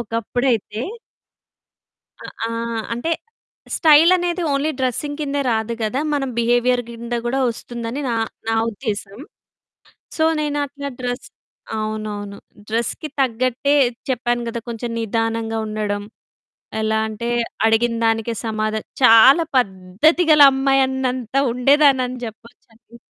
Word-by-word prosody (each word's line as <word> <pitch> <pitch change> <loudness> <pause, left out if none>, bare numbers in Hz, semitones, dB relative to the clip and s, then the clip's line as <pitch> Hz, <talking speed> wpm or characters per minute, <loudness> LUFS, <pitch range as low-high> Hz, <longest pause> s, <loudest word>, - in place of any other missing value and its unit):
ఒకప్పుడైతే 230 -1 -1 1.4
అ - - -13 0.2
ఆ! - - -3 0.4
అంటే 240 +8 -2 0.7
స్టైల్ 315 +1 +6
అనేది 350 0 -2
ఓన్లీ 280 +3 0
డ్రెసింగ్ 285 +4 -2
కిందే 285 -1 -1
రాదు 220 +1 -1
కదా! 220 +5 -1
మనం 270 -2 -1
బిహేవియర్ 245 +1 +2
కింద 235 +1 -6
కూడా 255 +3 0
వస్తుందని 235 +2 -6
నా 235 - 0 0.3
నా 225 - +2 0.2
ఉద్దేశం. 210 -3 -5 1.0
సో, 315 - +2 0.2
నేనట్లా 285 -1 -3
డ్రెస్ 245 0 -4 0.5
అవునవును. 215 -2 -4 0.3
డ్రెస్‌కి 235 +7 -2
తగ్గట్టే 255 +2 +1 0.4
చెప్పాను 240 -1 -1
కదా! 230 0 -4
కొంచెం 235 +1 -5
నిదానంగా 225 0 -1
ఉండడం 210 -1 -3 0.8
ఎలా 220 0 +1
అంటే 220 +2 -5 0.4
అడిగినదానికే 225 0 +1
సమాధ 215 -1 -1 0.3
చాలా 255 +7 +7
పద్ధతి 200 - +2
గల 300 -1 +7
అమ్మాయి 270 0 +2
అన్నంత 255 -3 -3 0.2
ఉండేదాన్ని 275 +2 +4
అని 255 +1 -6
చెప్పొచ్చండి. 230 +1 -14
235 Hz, 110 wpm, -20 LUFS, 225-270 Hz, 1.4 s, చాలా